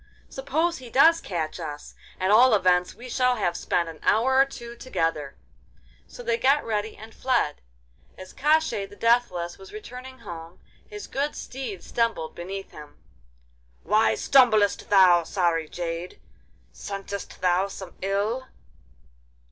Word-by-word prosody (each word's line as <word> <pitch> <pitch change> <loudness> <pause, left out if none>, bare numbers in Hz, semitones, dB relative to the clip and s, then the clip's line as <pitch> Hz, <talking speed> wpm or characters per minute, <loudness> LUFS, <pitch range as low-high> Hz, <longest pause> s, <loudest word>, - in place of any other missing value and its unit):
'Suppose 345 - -1
he 250 -2 -11
does 320 +7 +5
catch 165 -3 -4
us. 150 -3 -7 0.3
At 190 +1 +1
all 235 +2 +7
events 180 -2 +2
we 245 - -10
shall 250 0 +2
have 175 -7 -1
spent 170 0 0
an 160 -2 -9
hour 260 +4 +3
or 270 - +7
two 235 -3 -10
together.' 165 - -2 0.7
So - - -11
they 475 -1 0
got 280 - +3
ready 215 -1 -2
and 220 +2 -12
fled. 245 - 0 0.6
As 185 0 -11
Koshchei 295 -8 +1
the - - -13
Deathless 205 -8 +1
was 190 0 -12
returning 250 +4 -9
home, 165 -5 -9 0.3
his 420 -1 -8
good 285 +2 -2
steed 240 -9 -6
stumbled 230 -9 -1
beneath 195 +3 -7
him. 150 -1 -12 0.9
'Why 215 +4 +3
stumblest 220 -7 +3
thou, 185 -3 +6
sorry 165 -3 0
jade? 170 0 -5 0.5
Scentest 200 0 -7
thou 185 +1 +2
some 190 -2 -9
ill? 205 +7 -1
205 Hz, 140 wpm, -25 LUFS, 175-255 Hz, 0.9 s, all